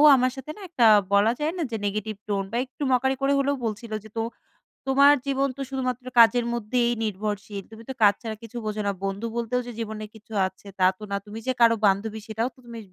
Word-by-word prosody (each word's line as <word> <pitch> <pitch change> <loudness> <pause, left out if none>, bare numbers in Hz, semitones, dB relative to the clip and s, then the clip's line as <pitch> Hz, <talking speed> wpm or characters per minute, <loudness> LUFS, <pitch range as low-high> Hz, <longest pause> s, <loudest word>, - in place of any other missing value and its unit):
আমার 255 0 +2
সাথে 265 +3 -6
না - - -11
একটা 255 -9 +3 0.3
বলা 205 +3 +5
যায় 300 +1 0
না - - -2
যে, 225 - -1
negative 215 +1 -3
tone 200 -2 -1
বা 235 - -1
একটু 260 +3 -20
mockery 265 +1 +2
করে 275 +1 +3
হলেও 280 +1 +1
বলছিল 225 +1 -4
যে, - - -11
"তো - - +1 0.7
তোমার 280 +2 +7
জীবন 275 0 +1
তো - - -5
শুধুমাত্র 255 -2 -3
কাজের 235 +1 +6
মধ্যেই 240 +1 +1
নির্ভরশীল। 205 -1 -3
তুমি 225 +1 -11
তো - - -2
কাজ 205 - +7
ছাড়া 220 -2 -4
কিছু 230 +1 -8
বোঝো 215 0 -2
না। - - +2
বন্ধু 195 +3 -3
বলতেও 235 +1 0
যে - - -5
জীবনে 220 -1 -4
কিছু 220 0 -14
আছে 190 +2 -15
তা 185 - +5
তো 215 - -12
না। 200 - +1
তুমি 210 +2 -7
যে - - +3
কারো 230 -1 +7
বান্ধবী 205 +3 +1
সেটাও 225 +3 -1
তো - - -22
তুমি 235 -1 -8
225 Hz, 225 wpm, -25 LUFS, 210-255 Hz, 0.7 s, তোমার